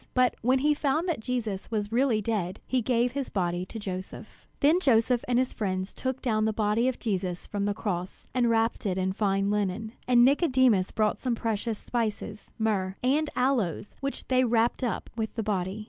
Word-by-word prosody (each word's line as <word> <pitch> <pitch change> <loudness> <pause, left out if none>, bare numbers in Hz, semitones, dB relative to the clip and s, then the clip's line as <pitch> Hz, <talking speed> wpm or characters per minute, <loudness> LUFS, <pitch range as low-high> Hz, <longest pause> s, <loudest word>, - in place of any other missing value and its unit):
But 255 -1 +3
when 255 +3 +3
he 295 +3 +3
found 300 +4 0
that 335 -8 -1
Jesus 220 -4 -3
was 210 -2 -2
really 235 -3 +2
dead, 195 -5 -2
he 260 -1 0
gave 240 +1 +1
his 275 0 -3
body 180 -1 -1
to 225 - -8
Joseph. 195 +1 -7
Then 310 +5 +4
Joseph 245 -5 +3
and 245 -1 +2
his 255 0 +1
friends 185 -2 -2
took 260 0 -4
down 215 -4 +1
the 220 - +2
body 215 +3 +1
of 260 - 0
Jesus 185 -5 -2
from 200 -1 -2
the 205 0 0
cross, 185 -4 -4
and 245 -2 +2
wrapped 225 -1 +1
it 185 -1 -1
in 190 0 0
fine 195 -1 +1
linen. 210 +1 -1 0.2
And 245 -1 +6
Nicodemus 260 - +3
brought 215 -1 0
some 250 -2 -1
precious 225 0 -2
spices, 215 -3 -4
myrrh 195 -4 0
and 295 +4 +2
aloes, 235 - 0
which 275 0 -4
they 255 0 +3
wrapped 235 +1 +1
up 240 - -2
with 220 -1 -3
the 225 - -2
body. 195 -1 -2
225 Hz, 195 wpm, -28 LUFS, 200-250 Hz, 0.2 s, And